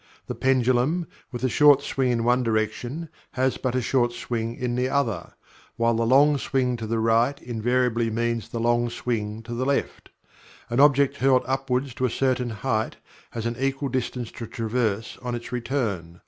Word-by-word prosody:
The - - -4
pendulum, 130 +6 +2 0.3
with 120 0 -6
a - - +3
short 145 +1 +5
swing 135 -3 0
in 115 -2 +1
one 125 +2 +3
direction, 120 +7 -2 0.3
has 130 0 +1
but 130 -2 -2
a 130 - 0
short 120 -1 +1
swing 115 -1 -3
in 125 -1 -2
the 125 +1 0
other; 120 -11 -1 0.4
while 115 0 +2
the 115 0 0
long 140 +3 +5
swing 130 -2 0
to 110 -1 -5
the 115 +1 -1
right 115 +5 +2
invariably 120 0 0
means 115 0 -1
the 115 - -4
long 120 +1 +2
swing 110 -2 -3
to 120 +1 -7
the 120 +2 -2
left. 140 +1 -2 0.6
An 120 - +1
object 140 -1 +4
hurled 130 -1 +3
upward 130 0 0
to 130 - +1
a - - +1
certain 130 0 0
height 110 0 -2 0.3
has 115 -1 -5
an 115 0 -1
equal 135 +1 -1
distance 125 -2 -3
to 115 - -7
traverse 110 -2 -2
on 125 -1 -3
its 120 0 -7
return. 110 -10 -3
120 Hz, 180 wpm, -25 LUFS, 115-130 Hz, 0.6 s, short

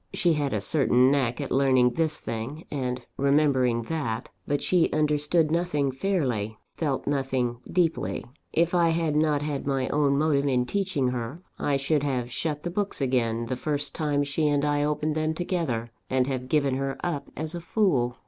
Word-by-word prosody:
She 170 - +3
had 145 -3 0
a 105 - -1
certain 130 +1 +3
knack 130 -3 +1
at 140 - -4
learning 130 -2 +4
this 160 +1 0
thing, 125 +8 -5
and 125 -3 -3
remembering 135 -4 +3
that; 120 -5 -3 0.2
but 145 0 0
she 180 -3 +3
understood 150 +1 +2
nothing 165 -5 +1
fairly, 130 - -1 0.2
felt 145 -5 -1
nothing 130 -4 -1
deeply. 165 - 0 0.3
If 170 +1 +2
I 170 -2 +4
had 165 -2 0
not 150 -1 +2
had 145 -2 -3
my 135 -2 0
own 140 -1 +2
motive 145 -2 +2
in 125 -2 +2
teaching 185 -6 0
her, 125 +7 -4 0.2
I 140 -1 +1
should 140 +2 +1
have 130 -4 -2
shut 150 +2 -3
the 175 - -3
books 205 +2 -2
again, 120 -4 0
the 130 - -2
first 145 +1 -2
time 145 -2 0
she 145 +2 0
and 145 0 +2
I 145 0 +1
opened 150 +1 0
them 155 +1 -1
together, 160 -10 -2 0.2
and 130 -1 +2
have 130 -1 -3
given 140 -3 +2
her 135 0 -2
up 170 -5 -2
as 155 +2 -2
a 175 - -5
fool. 140 - +1
145 Hz, 180 wpm, -26 LUFS, 130-155 Hz, 0.3 s, learning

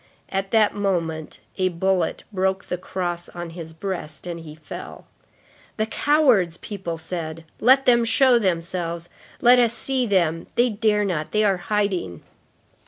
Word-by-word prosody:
—At 195 0 -2
that 220 -1 +3
moment, 170 -6 -2 0.2
a 185 0 +3
bullet 185 +1 0
broke 190 0 0
the 180 - -3
cross 175 -2 -4
on 175 -1 -7
his 165 -1 -8
breast, 160 -3 -6
and 170 -1 -5
he 155 -2 -10
fell. 155 -1 -9 0.7
"The 215 - +1
cowards!" 230 - +3
people 190 -5 -5
said. 160 -1 -5 0.2
"Let 265 +4 +5
them 240 -1 +5
show 245 +1 +5
themselves. 170 -3 -2 0.3
Let 245 +1 +7
us 235 -2 +3
see 260 0 0
them! 170 -5 +1
They 240 0 +3
dare 210 -1 +1
not! 165 -6 -2
They 215 0 +3
are 195 -3 +3
hiding!" 190 - -2
185 Hz, 150 wpm, -23 LUFS, 170-215 Hz, 0.7 s, Let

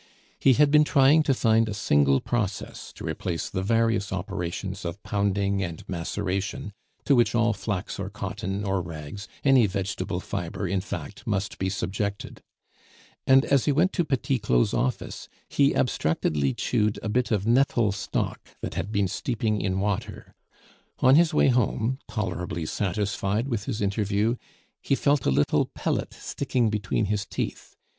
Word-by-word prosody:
He 135 - +5
had 145 +3 +4
been 150 0 +7
trying 145 +1 +5
to 145 -3 +2
find 115 -2 +3
a 105 - -3
single 70 -8 +3
process 105 -5 -3
to - - -9
replace 85 -2 -3
the 95 - -2
various 115 -1 +1
operations 95 0 -4
of 85 +3 -5
pounding 100 -1 0
and 85 -4 -5
maceration 95 +3 -3 0.3
to 140 - +4
which 120 -2 +3
all 115 -1 +3
flax 100 -3 -4
or - - -3
cotton 95 +2 -4
or 95 -2 0
rags, 85 +3 -7 0.2
any 135 -5 +5
vegetable 95 -1 -3
fibre, 95 +1 -4
in 95 +1 0
fact, 100 +4 -7
must 105 -1 -2
be 95 - 0
subjected; 100 +1 -3 0.9
and 135 0 +6
as 140 -3 +2
he 150 - +3
went 165 +7 +2
to 175 - +1
Petit 135 -3 0
Claud's 65 - +2
office, 65 - -2 0.2
he 140 0 +2
abstractedly 75 - 0
chewed 105 0 0
a - - -2
bit 120 +3 +1
of 105 -3 0
nettle 120 -2 +3
stalk 100 - -2 0.2
that - - -4
had 105 - -3
been 100 -2 +1
steeping 110 +1 -1
in 95 -1 0
water. 100 0 -3 0.7
On 130 - +6
his 165 +2 +5
way 150 - +4
home, 125 +1 +1
tolerably 90 -6 -3
satisfied 100 - -1
with 115 -5 -2
his 105 - -3
interview, 100 +3 +1 0.5
he 135 - +1
felt 140 -2 +1
a - - +5
little 70 +2 +2
pellet - - -1
sticking 125 -5 -1
between 105 0 0
his 105 0 -1
teeth. - - -5
105 Hz, 160 wpm, -26 LUFS, 95-120 Hz, 0.9 s, been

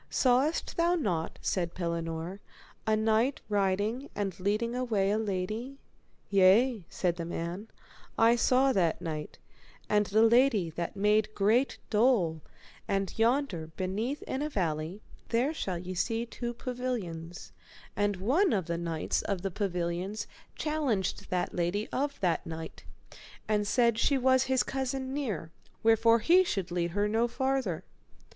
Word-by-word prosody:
Sawest 265 +5 +1
thou 340 +1 +3
not, 180 - -2
said 175 -3 -1
Pellinore, 170 +1 -3 0.5
a 215 - +4
knight 220 +5 +2
riding 205 +6 0
and 195 -3 -3
leading 210 +5 0
away 220 -6 +1
a 215 - +1
lady? 215 +6 -3 0.5
Yea, 200 +2 +4
said 175 -2 -1
the 170 - -3
man, 170 +4 -4 0.5
I 230 +1 +5
saw 260 +3 +3
that 175 -5 +1
knight, 155 -2 -5 0.5
and 210 -1 +2
the 215 +4 +4
lady 230 -7 +4
that 170 +4 -4
made 210 +2 +2
great 225 +7 +2
dole; 210 -9 +3 0.5
and 195 -1 -1
yonder 230 - +1
beneath 215 +10 -2
in 265 - -3
a 300 - -1
valley 170 - -2 0.3
there 245 +6 +1
shall 190 - -3
ye 180 +2 -6
see 225 +5 -1
two 240 0 -5
pavilions, 220 -10 -5 0.4
and 205 0 +1
one 275 - +2
of 190 -5 0
the 170 0 -2
knights 165 -2 -1
of 195 -3 -3
the 195 - -2
pavilions 180 +1 -2 0.3
challenged 285 -11 -1
that 180 -1 -1
lady 180 +5 -1
of 280 +1 -2
that 175 -4 +1
knight, 160 - -8 0.6
and 210 -1 +1
said 235 0 +3
she 280 +3 +3
was 260 0 +3
his 260 -1 +2
cousin 265 0 -3
near, 215 - -3 0.3
wherefore 225 +1 +5
he 345 +11 +5
should 195 - -3
lead 175 -1 0
her 205 +4 0
no 225 +3 +2
farther. 265 -8 -1
210 Hz, 145 wpm, -30 LUFS, 180-250 Hz, 0.6 s, I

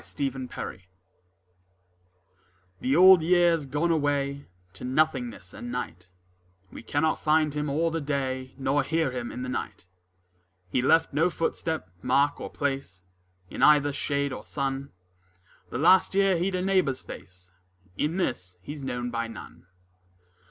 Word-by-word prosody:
The 140 -1 -3
Old 135 - -6
Year 125 -7 -6 2.0
The 130 +2 +1
Old 185 0 +8
Year's 170 -2 +3
gone 150 +5 0
away 140 -2 0 0.3
To 95 - -11
nothingness 125 -8 -1
and 120 0 -7
night: 90 -7 -5 0.6
We - - -9
cannot 145 +7 0
find 155 -1 +2
him 150 0 -2
all 165 +4 +1
the 165 0 -2
day 130 -3 -3
Nor 140 +1 +1
hear 160 0 0
him 125 -2 -4
in 125 - -5
the - - -4
night: 125 - -5 0.9
He 125 - +2
left 160 +4 +3
no 160 +5 +3
footstep, 160 - -2
mark 140 +5 +2
or - - -5
place 135 -10 -3 0.5
In - - -5
either 145 -1 +5
shade 140 -1 -1
or - - -7
sun: 135 0 -3 0.8
The - - -4
last 185 +6 +4
year 195 -1 +4
he'd 185 +3 0
a 180 - -1
neighbour's 185 -9 +1
face, 90 -1 -11 0.4
In 155 - -1
this 90 - -2
he's 145 0 -7
known 125 -2 -3
by 115 -1 -2
none. 90 -6 -11
140 Hz, 145 wpm, -27 LUFS, 125-160 Hz, 2.0 s, Old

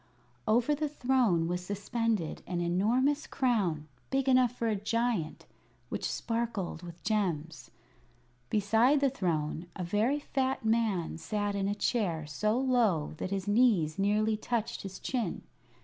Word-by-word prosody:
Over 240 +6 +3
the 300 +1 -1
throne 245 - +2
was 180 +1 -2
suspended 205 -1 -2
an 175 -1 -2
enormous 230 +12 +1
crown 190 - 0 0.2
big 270 0 0
enough 255 -2 +5
for 235 -2 -2
a 220 - +1
giant 210 -5 -1 0.4
which - - -2
sparkled 225 -8 -2
with 170 -1 -11
gems. 165 -8 -1 0.8
Beside 225 +7 +3
the 275 -1 +2
throne 165 - -2
a 185 - -4
very 215 +11 +1
fat 265 -4 -1
man 220 -8 +1
sat 205 +5 -2
in 195 -1 -1
a 205 - 0
chair 190 -8 0
so 210 +10 0
low 235 - +2
that - - -3
his 195 -1 -3
knees 205 -8 +3
nearly 210 +2 +2
touched 225 +1 -2
his 190 -1 -7
chin. 235 -9 -3
210 Hz, 140 wpm, -30 LUFS, 175-245 Hz, 0.8 s, enough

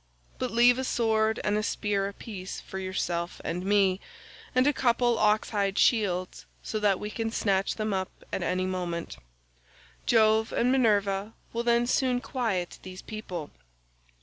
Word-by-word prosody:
But 255 - -1
leave 240 +2 +5
a - - -1
sword 220 -3 +1
and 210 0 +1
a - - 0
spear 205 -2 -1
apiece 200 -2 -7
for 190 - -7
yourself 175 -2 -2
and 180 +2 -2
me, 195 -1 +3 0.6
and 255 +1 +4
a 290 - +4
couple 240 -1 +2
of 230 - -2
oxhide 210 -2 +1
shields 185 -6 +1 0.2
so 215 - -3
that 205 -3 +2
we 210 - -5
can 225 +1 -2
snatch 195 -3 0
them 215 -1 -2
up 190 -1 -1 0.2
at - - -1
any 185 0 0
moment; 175 - -3 0.9
Jove 220 -1 +4
and 245 +2 +2
Minerva 205 -4 +2 0.2
will 230 - -1
then 235 0 +3
soon 250 0 +1
quiet 225 -9 -2
these 185 0 -9
people. 185 -8 -6
210 Hz, 155 wpm, -28 LUFS, 190-230 Hz, 0.9 s, leave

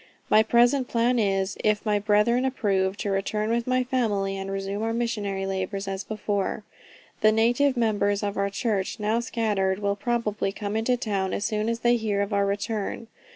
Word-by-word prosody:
My 215 - +7
present 245 +3 +3
plan 240 +1 +1
is, 195 -2 0
if 215 0 +1
my 210 -1 +2
brethren 210 +4 +2
approve, 200 -7 0
to 205 - -2
return 210 +3 -1
with 235 +1 0
my 255 0 +2
family, 210 -6 0
and 195 0 -5
resume 195 +1 -3
our 225 +1 -1
missionary 205 -5 -2
labors 195 +1 -3
as 195 0 -3
before. 205 -1 -2 0.6
The 215 - +6
native 245 +5 +2
members 205 -3 +1
of 205 0 -2
our 200 0 0
church, 200 -2 -2
now 215 +2 +1
scattered, 210 -5 0
will 200 0 -1
probably 215 -2 -1
come 205 0 -4
into 230 +3 +1
town 200 -5 -2
as 205 - -2
soon 215 0 -1
as 230 0 -2
they 240 0 +4
hear 210 -3 0
of 200 +1 -4
our 200 0 +2
return. 205 +2 -3
210 Hz, 185 wpm, -25 LUFS, 200-230 Hz, 0.6 s, My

